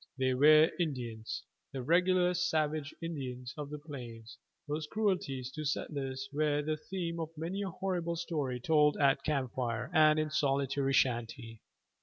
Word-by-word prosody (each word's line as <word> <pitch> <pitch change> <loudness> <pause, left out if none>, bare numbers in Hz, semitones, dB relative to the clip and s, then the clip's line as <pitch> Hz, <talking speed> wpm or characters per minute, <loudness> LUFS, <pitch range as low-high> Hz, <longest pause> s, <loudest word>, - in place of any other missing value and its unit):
They 130 -1 +2
were 155 +4 +6
Indians, 120 -9 -3 0.3
the 130 -2 -5
regular 180 +4 +3
savage 155 -4 0
Indians 130 -6 -5
of 150 -2 -6
the 150 - -5
plains, 120 -7 -9 0.3
whose 150 +1 -3
cruelties 155 - -1
to 155 - -5
settlers 135 -2 -3
were 150 0 +1
the 155 +1 -1
theme 170 0 -4
of 160 -1 -3
many 175 +6 -3
a 195 - -2
horrible 175 -2 -2
story 150 -7 -2
told 150 +2 +3
at 140 0 +3
camp 135 -5 -1
fire 120 +3 -2
and 155 -1 +6
in 155 0 0
solitary 140 -2 +1
shanty. 120 -3 0
150 Hz, 150 wpm, -32 LUFS, 130-160 Hz, 0.3 s, were